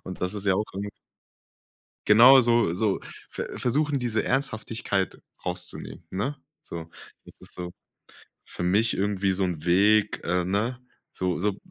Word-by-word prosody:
Und 95 - -8
das 90 +3 -1
ist 100 -1 -5
ja 95 - +4
auch 105 - 0
irgend 100 +1 -4 1.2
Genau 125 +6 +9
so 120 -7 +3
so 100 +2 0 0.3
ver - - -6
versuchen, 145 +3 +1
diese 120 -3 -1
Ernsthaftigkeit 110 -7 -1 0.2
rauszunehmen, 90 -1 -5
ne? 125 +10 -2 0.3
So, 80 -1 -8 0.4
das - - -17
ist - - -10
so 90 -1 -6 0.7
für - - -7
mich 105 +6 +2
irgendwie 100 -1 0
so 95 +1 0
'n 85 -4 -3
Weg, 100 +4 +3
äh, 90 +1 +1
ne? 110 +7 -1 0.3
So 90 -1 -1
so 100 0 0
100 Hz, 150 wpm, -26 LUFS, 90-115 Hz, 1.2 s, Genau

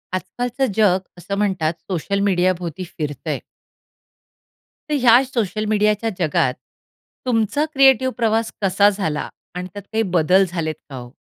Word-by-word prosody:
आजकालचं 245 +8 -2
जग 195 -4 +4 0.2
असं 200 +3 -4
म्हणतात 185 -6 0 0.2
सोशल 195 +2 -1
मीडियाभोवती 180 -2 0
फिरतंय. 145 -2 -3 1.5
तर 300 - +1
ह्याच 250 +2 +5
सोशल 215 -2 -1
मीडियाच्या 210 +1 +2
जगात 145 -6 +1 0.7
तुमचा 245 +4 +1
क्रिएटिव्ह 265 -2 +4
प्रवास 225 -1 +1
कसा 200 +1 +4
झाला 175 -7 -2 0.3
आणि 180 0 -4
त्यात 205 - -8
काही 225 0 +2
बदल 180 0 +3
झालेत 160 -3 -2
का 135 - -8
हो? 120 -1 -9
200 Hz, 130 wpm, -21 LUFS, 175-225 Hz, 1.5 s, ह्याच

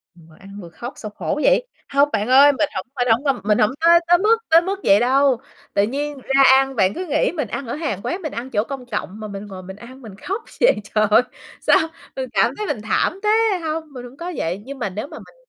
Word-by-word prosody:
Vừa 160 -2 -19
ăn 195 - -14
vừa 170 - -10
khóc 235 +10 -8
sao 215 - -8
khổ 300 - -3
vậy? - - +3 0.2
Hông 280 +1 +3
bạn 210 +3 0
ơi. 275 +3 +7
Mình 290 +2 -1
hổng - - -3
phải 245 -1 0
hổng 240 +6 +2
ơm, 270 -7 0
mình 210 0 +2
hổng 210 - +3
có 340 +1 +6
tới 350 0 +6
mức 435 +4 +3
tới 330 +1 +6
mức 385 +3 -3
vậy 200 +1 +5
đâu. 260 0 +2 0.3
Tự 200 - +3
nhiên 285 +5 -3
ra 270 +1 +2
ăn, 270 0 +3
bạn 195 -3 +2
cứ 365 - -5
nghĩ 300 - +1
mình 300 -8 -3
ăn 255 +4 -5
ở - - -3
hàng 290 - -3
quán, 370 +3 -3
mình 310 - -5
ăn 245 +3 -6
chỗ 210 -3 0
công 265 -1 -7
cộng 210 -3 -5
mà 215 - -6
mình 200 0 -7
ngồi 185 -2 -9
mình 190 +1 -9
ăn 255 +5 -13
mình 215 -5 -11
khóc 405 +5 -3 0.2
vậy, - - +5
trời 215 +1 +1
ơi, 215 - +6 0.4
sao - - +4 0.4
mình 260 -2 -4
cảm - - +2
thấy 425 0 -4
mình 240 -8 -3
thảm 290 - 0
thế! 420 - +1 0.3
Hông, 315 0 -2
mình 245 -1 -8
hổng 250 +3 -13
có 350 +2 -5
vậy. 175 +5 -3
Nhưng 275 0 -8
mà 220 - -2
nếu 210 +8 -6
mà - - -10
mình - - -16
260 Hz, 265 wpm, -20 LUFS, 210-300 Hz, 0.4 s, ơi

